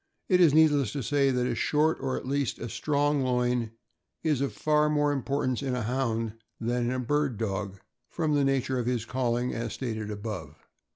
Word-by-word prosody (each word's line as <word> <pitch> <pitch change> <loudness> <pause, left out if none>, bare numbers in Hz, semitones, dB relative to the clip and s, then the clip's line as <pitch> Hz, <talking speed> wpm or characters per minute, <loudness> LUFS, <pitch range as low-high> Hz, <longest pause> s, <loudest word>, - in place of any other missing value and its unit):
It 180 -2 +5
is 165 -4 +7
needless 145 -7 +4
to 140 - -3
say 140 +3 +2
that 125 -1 +1
a 125 - 0
short, 155 +6 +1
or 130 -1 -1
at - - -6
least 140 -1 -1
a 115 - -6
strong 145 +2 +1
loin, 125 -2 +1 0.5
is 150 -5 +1
of 140 - 0
far 150 0 +2
more 145 -1 +2
importance 135 -2 -1
in 135 -2 -1
a 125 - -2
Hound 115 -2 -1 0.3
than 120 +1 0
in 120 - 0
a 130 - -1
bird 140 -1 0
dog, 100 -2 -3 0.3
from 155 -3 -1
the 145 -1 +3
nature 130 -1 +1
of 120 - -2
his 120 -3 0
calling, 125 0 -1
as 115 -1 -3
stated 110 -5 -4
above. 105 +1 -6
130 Hz, 195 wpm, -28 LUFS, 120-145 Hz, 0.5 s, is